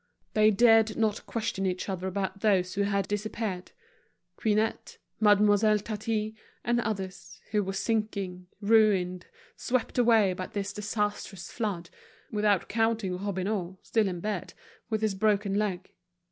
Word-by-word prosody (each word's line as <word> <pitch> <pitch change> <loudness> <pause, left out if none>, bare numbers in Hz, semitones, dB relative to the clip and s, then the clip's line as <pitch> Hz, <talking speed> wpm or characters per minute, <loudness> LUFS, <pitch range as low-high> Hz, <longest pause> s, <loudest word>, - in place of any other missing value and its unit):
They 215 0 +5
dared 225 0 +5
not 220 -1 0
question 200 -4 -2
each 180 0 -2
other 190 -1 -3
about 190 +1 -3
those 190 -3 +2
who 200 - 0
had 200 -1 0
disappeared, 205 -2 -3 0.6
Quinette, 220 +2 0 0.2
Mademoiselle 210 0 +5
Tatin, 215 +1 -3 0.3
and 240 +1 +1
others, 195 -4 -5
who 210 -1 +2
were 195 0 -3
sinking, 195 -4 -2
ruined, 200 -4 +3 0.3
swept 250 0 -1
away 225 -5 +5
by 185 0 -5
this 200 0 -4
disastrous 205 -3 -3
flood; 195 -7 -3 0.4
without 210 -3 +2
counting 225 -4 0
Robineau, 190 -1 -2
still 220 -3 +1
in 180 -2 -4
bed, 210 -3 -4 0.3
with 220 -2 -1
his 215 -2 +2
broken 205 0 +1
leg. 195 -3 -1
205 Hz, 130 wpm, -28 LUFS, 190-220 Hz, 0.6 s, They